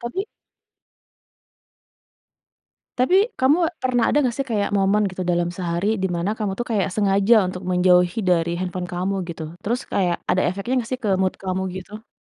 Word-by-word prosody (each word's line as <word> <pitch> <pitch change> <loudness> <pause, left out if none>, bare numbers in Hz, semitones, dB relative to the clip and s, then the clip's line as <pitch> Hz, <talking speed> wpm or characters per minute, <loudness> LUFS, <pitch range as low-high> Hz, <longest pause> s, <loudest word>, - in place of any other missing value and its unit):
Tapi 305 - -4 2.7
Tapi 260 +9 +3 0.2
kamu 275 +6 +3 0.2
pernah 245 -2 +2
ada 295 - +2
nggak 245 -2 0
sih, 275 - -1
kayak 210 -4 -1
momen 200 +2 +3
gitu 185 0 -5
dalam 175 -1 +1
sehari 180 +5 -1
dimana 175 +1 -1
kamu 205 -3 -1
tuh 240 - -2
kayak 200 -3 +1
sengaja 200 +2 +3
untuk 180 0 -6
menjauhi 180 +1 +3
dari 170 -2 +1
handphone 180 0 -3
kamu, 180 +2 -2
gitu? 165 -1 -6 0.2
Terus 240 +4 -1
kayak 180 -3 +1
ada 185 - +2
efeknya 195 +8 -2
nggak 235 0 -4
sih 255 - -2
ke 210 - 0
mood 185 - 0
kamu, 190 0 -3
gitu? 210 +4 -9
195 Hz, 160 wpm, -22 LUFS, 180-225 Hz, 2.7 s, Tapi